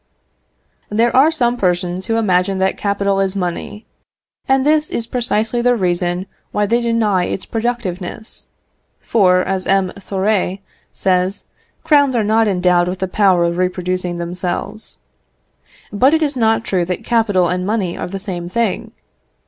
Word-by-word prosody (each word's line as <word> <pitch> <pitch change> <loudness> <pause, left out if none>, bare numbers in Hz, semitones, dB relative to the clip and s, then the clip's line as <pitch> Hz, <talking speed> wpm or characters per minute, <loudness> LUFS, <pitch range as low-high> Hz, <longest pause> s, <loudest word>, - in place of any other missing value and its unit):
There 230 +3 +1
are 275 +4 +6
some 245 -6 0
persons 180 -1 -1
who 225 - 0
imagine 195 -3 +1
that 190 0 +1
capital 200 -1 0
is 195 0 0
money, 185 +3 -4 0.6
and 265 0 +2
this 305 0 +2
is 230 - -2
precisely 235 -1 0
the 245 0 +3
reason 180 -2 -1 0.3
why 210 - +1
they 235 +4 +1
deny 220 -6 +1
its 185 - -4
productiveness; 220 -3 -4 0.5
for, 185 -5 +3
as 190 -1 -2
M. 195 -1 +2
Thoré 195 0 -1 0.3
says, 185 +1 0 0.4
crowns 285 -5 +3
are 225 - +2
not 220 +1 +2
endowed 180 -2 +2
with 180 +1 -3
the 190 +1 -2
power 185 -2 +3
of 170 0 0
reproducing 180 -1 -1
themselves. 180 +4 -5 1.0
But 260 +9 +4
it 320 - +1
is 290 -2 -1
not 225 -2 +2
true 185 -2 0
that 180 +1 -4
capital 210 -7 +2
and 180 +1 -1
money 195 -3 -1
are - - -4
the 195 +2 -5
same 180 -3 -5
thing. 225 0 -2
195 Hz, 150 wpm, -18 LUFS, 180-230 Hz, 1.0 s, are